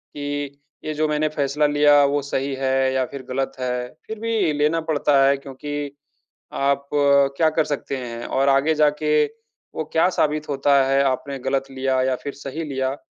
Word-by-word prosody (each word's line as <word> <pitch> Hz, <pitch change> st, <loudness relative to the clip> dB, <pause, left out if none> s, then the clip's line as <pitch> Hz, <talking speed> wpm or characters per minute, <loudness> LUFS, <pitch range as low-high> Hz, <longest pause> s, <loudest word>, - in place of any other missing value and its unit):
कि 145 Hz, -1 st, -4 dB, 0.3 s
ये 155 Hz, -, -2 dB
जो 155 Hz, +1 st, 0 dB
मैंने 150 Hz, 0 st, +1 dB
फ़ैसला 150 Hz, 0 st, 0 dB
लिया 145 Hz, 0 st, +5 dB
वो 145 Hz, +1 st, +1 dB
सही 140 Hz, 0 st, -2 dB
है 130 Hz, 0 st, +1 dB
या 130 Hz, -1 st, +1 dB
फिर 140 Hz, -, -8 dB
गलत 135 Hz, +1 st, -1 dB
है? 125 Hz, -1 st, -2 dB, 0.2 s
फिर 220 Hz, -1 st, -6 dB
भी 220 Hz, -7 st, 0 dB
लेना 150 Hz, +3 st, +1 dB
पड़ता 145 Hz, -2 st, +3 dB
है 140 Hz, 0 st, +3 dB
क्योंकि 145 Hz, +1 st, -6 dB, 0.6 s
आप 140 Hz, 0 st, 0 dB, 0.5 s
क्या 160 Hz, -1 st, +4 dB
कर 155 Hz, 0 st, 0 dB
सकते 140 Hz, -1 st, -3 dB
हैं? 120 Hz, -2 st, -6 dB
और 135 Hz, +1 st, +1 dB
आगे 140 Hz, +4 st, +3 dB
जाके 150 Hz, 0 st, +2 dB, 0.5 s
वो 160 Hz, -, -2 dB
क्या 165 Hz, +3 st, +4 dB
साबित 155 Hz, -3 st, -1 dB
होता 140 Hz, 0 st, +3 dB
है, 135 Hz, 0 st, +3 dB
आपने 135 Hz, +1 st, -2 dB
गलत 135 Hz, +1 st, -2 dB
लिया 130 Hz, 0 st, 0 dB
या 130 Hz, 0 st, +1 dB
फिर 140 Hz, -, -4 dB
सही 140 Hz, +3 st, -6 dB
लिया, 135 Hz, -2 st, -2 dB
140 Hz, 180 wpm, -22 LUFS, 135-150 Hz, 0.6 s, लिया